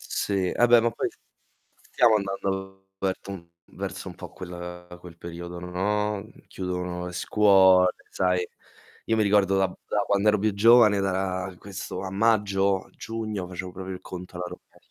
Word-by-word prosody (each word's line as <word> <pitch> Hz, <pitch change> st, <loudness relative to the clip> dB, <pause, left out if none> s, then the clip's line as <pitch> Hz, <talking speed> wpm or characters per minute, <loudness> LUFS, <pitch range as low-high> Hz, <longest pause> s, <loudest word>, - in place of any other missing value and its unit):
Sì, 95 Hz, -3 st, -1 dB
ah 120 Hz, -, +4 dB
beh, 120 Hz, -1 st, +7 dB
ma 120 Hz, +1 st, +1 dB
poi -, -, -2 dB, 0.8 s
stiamo 115 Hz, -3 st, +5 dB
andando 95 Hz, -1 st, -4 dB
verso 95 Hz, +1 st, -3 dB
un 85 Hz, -4 st, -8 dB, 0.2 s
verso -, -, -6 dB
un -, -, -9 dB
po' -, -, -9 dB
quel 90 Hz, -1 st, -8 dB
quel 85 Hz, -2 st, -12 dB
periodo, 85 Hz, +1 st, -7 dB
no, 105 Hz, +4 st, -1 dB
mhmm, 110 Hz, +3 st, -13 dB
chiudono 90 Hz, -1 st, -4 dB
le 90 Hz, -, -6 dB
scuole, 95 Hz, -2 st, +5 dB, 0.2 s
sai. 90 Hz, -1 st, +1 dB, 0.6 s
Io 115 Hz, -, +2 dB
mi 110 Hz, -, +3 dB
ricordo 100 Hz, -2 st, +3 dB
da 95 Hz, 0 st, +3 dB, 0.2 s
da -, -, -1 dB
quando 100 Hz, +1 st, +2 dB
ero 105 Hz, -, +4 dB
più 105 Hz, +1 st, +1 dB
giovane, 110 Hz, -1 st, +6 dB
da 95 Hz, 0 st, +1 dB, 0.4 s
ra 95 Hz, -2 st, -9 dB
questo 95 Hz, -1 st, -6 dB
a 95 Hz, -, -4 dB
maggio, 100 Hz, -2 st, +2 dB
giugno 110 Hz, -4 st, -5 dB
facevo 90 Hz, 0 st, -6 dB
proprio 95 Hz, +1 st, -6 dB
il 90 Hz, -, -9 dB
conto 90 Hz, -1 st, -9 dB
alla 90 Hz, -, -3 dB
rovesc 90 Hz, -, -15 dB
95 Hz, 170 wpm, -26 LUFS, 90-105 Hz, 0.8 s, beh